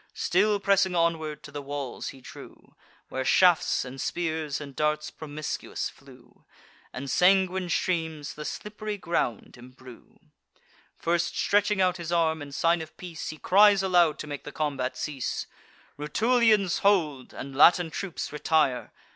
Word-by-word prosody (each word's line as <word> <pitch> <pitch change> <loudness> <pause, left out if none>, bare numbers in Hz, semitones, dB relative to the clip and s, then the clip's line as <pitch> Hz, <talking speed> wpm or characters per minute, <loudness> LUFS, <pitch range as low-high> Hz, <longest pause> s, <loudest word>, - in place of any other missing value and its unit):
Still 205 +3 +2
pressing 195 -2 +2
onward, 165 -3 0
to 150 - -11
the 145 0 -6
walls 140 -2 -5
he 135 - -8
drew, - - -13 0.4
Where 130 - -3
shafts, 175 +2 +3
and 130 +1 -7
spears, 160 -4 -2
and 140 -2 -9
darts 150 0 -1
promiscuous 155 -1 -5
flew, - - -19 0.5
And 130 +3 -6
sanguine 185 +4 +3
streams 160 -5 -1
the 150 - -10
slipp'ry 210 +5 -5
ground 145 - -2
embrue. 125 0 -15 0.8
First 170 0 -1
stretching 205 -1 +2
out 185 0 +2
his 170 -1 -6
arm, 160 -2 +1
in 145 -1 -8
sign 165 +4 +1
of 160 - -10
peace, 175 -3 -7
He 155 - -7
cries 200 +3 +5
aloud, 175 -4 +3
to - - -6
make 145 -2 -6
the 145 - -8
combat 140 -4 -2
cease: 140 -5 -3 0.5
"Rutulians, 215 - +2
hold; 160 -10 +1
and 135 0 -8
Latin 170 +3 +5
troops, 180 -3 -5
retire! 150 -4 +1
160 Hz, 145 wpm, -27 LUFS, 145-185 Hz, 0.8 s, cries